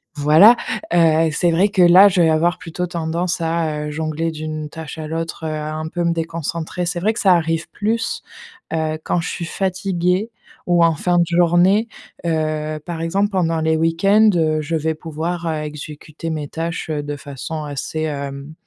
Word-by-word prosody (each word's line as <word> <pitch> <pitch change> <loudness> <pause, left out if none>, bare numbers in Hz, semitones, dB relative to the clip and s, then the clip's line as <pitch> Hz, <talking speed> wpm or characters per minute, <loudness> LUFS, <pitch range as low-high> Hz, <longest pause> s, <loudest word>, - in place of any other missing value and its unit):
Voilà, 155 +11 +7 0.4
heu, 165 -1 +4
c'est 170 +3 +1
vrai 185 +5 +3
que 195 -2 +1
là 180 +3 +8
je 185 -2 +2
vais 165 - +4
avoir 160 +2 +2
plutôt 180 +1 -4
tendance 170 0 -2
à, 160 -2 -1
heu, - - -5
jongler 160 +1 -2
d'une 155 -1 -5
tâche 160 0 -8
à 155 - -5
l'autre, 165 0 -4
heu, - - -2
un 155 +1 -4
peu 175 +2 -3
me 170 0 +2
déconcentrer. 165 +1 -3
C'est 175 0 -2
vrai 215 +5 +1
que 225 - -5
ça 190 -3 +5
arrive 165 -1 0
plus, 225 +2 -2 0.5
heu, 160 -1 -1
quand - - 0
je - - -5
suis 170 - -4
fatiguée 185 +2 -1 0.4
ou 175 -1 +4
en 165 - +3
fin 175 +3 0
de 170 - +4
journée, 175 +6 +3 0.4
heu, 155 -1 -1
par 170 -2 -5
exemple 195 +5 0
pendant 165 -4 0
les 160 0 +2
week-ends, 195 +7 +4
heu, 155 -2 +1
je 160 +2 -2
vais 160 0 0
pouvoir, 165 +2 -4
heu, 155 -2 -2
exécuter 150 +1 -7
mes 155 -2 -3
tâches, 165 +1 -4
heu, 150 -1 -1
de 145 0 -5
façon 145 +2 -6
assez, 145 +2 -4
hem, 140 -1 -5
165 Hz, 185 wpm, -20 LUFS, 155-175 Hz, 0.5 s, là